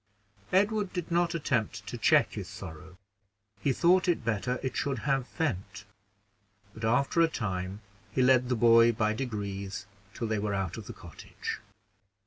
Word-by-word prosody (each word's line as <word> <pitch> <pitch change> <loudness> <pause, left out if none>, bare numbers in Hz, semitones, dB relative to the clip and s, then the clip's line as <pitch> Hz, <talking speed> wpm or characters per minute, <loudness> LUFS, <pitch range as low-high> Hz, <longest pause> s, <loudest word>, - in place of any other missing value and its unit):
Edward 205 +1 +2
did 175 -1 -4
not 170 0 +2
attempt 125 -9 -1
to - - -6
check - - +3
his - - -5
sorrow, 80 +2 -10 0.6
he 140 - +1
thought 180 +7 +4
it 170 -9 +1
better 115 +3 -1
it 130 - -2
should 140 -2 -1
have 135 -3 +1
vent; 105 - -3 0.9
but, 110 - -10
after 130 +8 +2
a 165 - +6
time, 95 - -3 0.3
he 130 +3 +2
led 125 -1 +4
the 125 - +2
boy 115 0 +6
by 110 -1 +1
degrees 100 -4 -4 0.3
till 115 - -3
they 110 -1 0
were 100 -1 -1
out 95 -2 -2
of 110 -3 -8
the - - -6
cottage. 85 -3 -7
115 Hz, 160 wpm, -29 LUFS, 100-140 Hz, 0.9 s, a